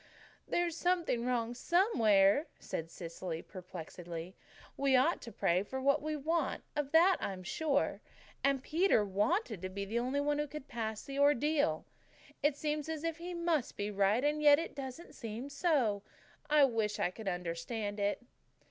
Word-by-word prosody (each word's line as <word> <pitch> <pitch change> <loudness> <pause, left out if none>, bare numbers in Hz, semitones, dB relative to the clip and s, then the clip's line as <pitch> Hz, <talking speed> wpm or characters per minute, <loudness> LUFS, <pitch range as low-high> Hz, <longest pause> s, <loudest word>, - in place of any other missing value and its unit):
"There's 345 -2 0
something 335 -9 0
wrong 240 -2 0
somewhere," 240 - +3
said 165 0 -5
Cecily 165 0 -6
perplexedly. 175 -1 -8 0.4
"We 275 -1 +3
ought 270 +7 +3
to 235 - -8
pray 175 -3 +1
for 260 +6 -5
what 280 +2 +3
we 310 +1 -2
want, 310 +1 -1
of 290 -1 -2
that 345 +3 +6
I'm 190 -2 -4
sure 285 - 0 0.4
and 275 -1 +2
Peter 320 - +3
wanted 210 - 0
to 185 - -4
be 200 +1 -4
the 225 +4 -1
only 255 +4 -1
one 290 +1 +1
who 295 - -1
could 290 -1 -8
pass 220 -3 -4
the 275 0 -5
Ordeal. 290 +1 +3 0.6
It 290 -1 +2
seems 300 0 -2
as 320 -1 -4
if 330 -1 -2
he 350 +1 -6
must 335 -6 0
be 205 +1 -2
right 200 +4 +2
and 300 +1 +1
yet 290 -1 +8
it 330 +2 -4
doesn't 275 +4 -7
seem 230 +4 -6
so. 280 - +1 0.5
I 300 -1 +6
wish 220 -4 0
I 175 - 0
could 215 +2 -9
understand 185 +4 -3
it." 205 +4 0
265 Hz, 165 wpm, -33 LUFS, 205-300 Hz, 0.6 s, yet